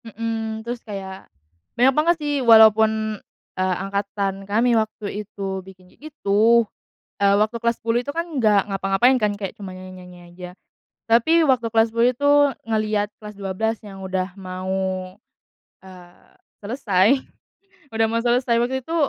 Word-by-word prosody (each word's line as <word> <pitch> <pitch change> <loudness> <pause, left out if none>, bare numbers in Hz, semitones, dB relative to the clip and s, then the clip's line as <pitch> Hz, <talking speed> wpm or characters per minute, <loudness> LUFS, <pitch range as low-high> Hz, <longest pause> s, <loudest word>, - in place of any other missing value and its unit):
Mhm, 225 0 -4
terus 240 0 -5
kayak, 195 -3 -8 0.5
banyak 255 +3 +4
banget 320 +5 +3
sih 295 -2 -3
walaupun, 220 -2 +5 0.4
eee, 185 0 0
angkatan 200 0 -3
kami 235 +4 +2
waktu 215 -2 -2
itu 195 -2 -5
bikin 185 -1 -17
kayak 310 - -12
gitu, 230 -3 +3 0.5
eee, 200 -1 +3
waktu 215 +3 +1
kelas 235 0 -1
10 235 +2 0
itu 285 - -5
kan 335 +2 -3
nggak 210 -4 +2
ngapa-ngapain 195 +6 +2
kan 210 -3 0
kayak 200 -2 -6
cuma 195 -3 -8
nyanyi-nyanyi 185 -1 -12
aja. 180 0 -9 0.6
Tapi 315 +9 +4
waktu 245 -4 +1
kelas 225 0 +2
10 235 +1 +4
itu 255 +3 -3 0.4
ngelihat 215 -2 -1
kelas 210 -1 -10
12 205 +3 -2
yang 195 -1 -10
udah 185 -1 -3
mau, 185 0 -4 0.7
eee, 180 -2 -17 0.2
selesai, 215 +2 +1 0.7
udah 225 0 +2
mau 230 - 0
selesai 240 0 +1
waktu 260 +2 -1
itu 325 +6 -6
215 Hz, 145 wpm, -22 LUFS, 195-235 Hz, 0.7 s, walaupun